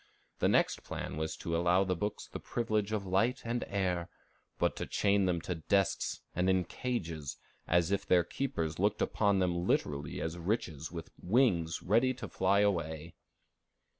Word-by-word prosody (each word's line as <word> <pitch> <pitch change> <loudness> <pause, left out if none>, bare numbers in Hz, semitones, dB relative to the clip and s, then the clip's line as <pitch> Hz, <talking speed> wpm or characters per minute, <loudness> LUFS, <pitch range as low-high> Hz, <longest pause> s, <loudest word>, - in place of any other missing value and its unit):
The - - +3
next - - +2
plan - - -5
was 80 +1 -3
to 85 - -3
allow 90 +3 +3
the 95 -1 0
books 105 +4 -3
the - - -7
privilege 110 -3 -1
of 105 -2 -1
light 115 +8 +1
and 120 +1 -1
air, 90 -3 -1 0.5
but - - +1
to - - -3
chain 100 -1 +2
them 90 -2 +1
to 90 - -3
desks 95 +3 0
and 90 +2 +2
in 95 -1 +3
cages, 85 - -4 0.3
as 85 +1 +3
if 100 - 0
their 90 -1 +5
keepers 85 - -3
looked 105 +2 +2
upon 100 -2 +2
them 90 -1 0
literally 70 -1 0
as 80 +2 -3
riches 85 -5 -2
with 85 -2 -7
wings 90 -6 +2
ready 120 +7 +3
to 130 - -6
fly 95 +2 +2
away. 85 -5 -1
90 Hz, 165 wpm, -32 LUFS, 85-105 Hz, 0.5 s, their